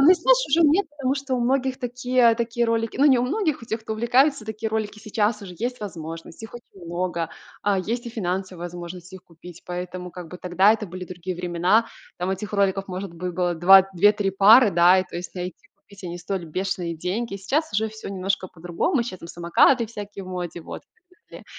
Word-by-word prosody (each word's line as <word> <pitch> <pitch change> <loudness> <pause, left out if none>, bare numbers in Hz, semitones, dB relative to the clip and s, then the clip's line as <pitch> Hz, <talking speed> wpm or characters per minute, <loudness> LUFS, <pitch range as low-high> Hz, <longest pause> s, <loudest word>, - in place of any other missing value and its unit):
ну, 310 +7 +8
знаешь, - - +3
уже 335 - +4
нет, 340 +6 +3
потому 275 -3 -1
что 275 -2 -3
у 245 - -1
многих 260 +1 0
такие 245 -1 +2
такие 235 0 -1
ролики, 230 0 -1
ну, 285 - +4
не 265 -4 +6
у - - +1
многих, 310 - -1
у - - -7
тех, 220 0 -3
кто 220 - -5
увлекается, 245 +3 +2
такие 220 0 -4
ролики 215 -1 -3
сейчас 215 0 -1
уже 180 -2 -9
есть 245 +1 -3
возможность, 165 -1 -8
их 225 - -9
очень 195 -6 -13
много, 170 -1 -3 0.3
а, 200 -2 +2
есть 235 +6 -3
и - - -5
финансовая 185 -4 -3
возможность 175 +1 -8
их 190 - -10
купить, 170 0 -14
поэтому, 180 0 -6
как 175 -2 -9
бы, 180 - -9
тогда 185 +4 +4
это 215 -2 -3
были 180 +1 -7
другие 180 0 -6
времена. 180 +6 +2 0.3
Там 180 +2 -2
этих 200 +2 -4
роликов, 195 -1 +1
может 185 -1 -6
быть, 180 +1 -4
было 175 0 0
2 190 +3 +8
2-3 205 +2 +3
пары, 210 +4 +7
да, 175 +2 +5
и, 185 - +1
то - - -16
есть, 175 +1 -7
найти, 180 -1 -7
купить- 200 0 -17
они 175 0 -5
стоили 175 -1 -4
бешеные 175 0 -3
деньги. 195 +5 -3
Сейчас 275 +11 -1
уже 220 +1 +1
всё 220 -1 -9
немножко 195 -1 -2
по-другому. 175 - -1
Щас 190 -6 -7
там 170 - -10
самокаты 195 +8 +3
всякие 205 -3 -8
в - - -10
моде, 175 -2 -5
вот, - - -8
в 360 - -41
смысле, - - -15
195 Hz, 210 wpm, -24 LUFS, 180-235 Hz, 0.3 s, ну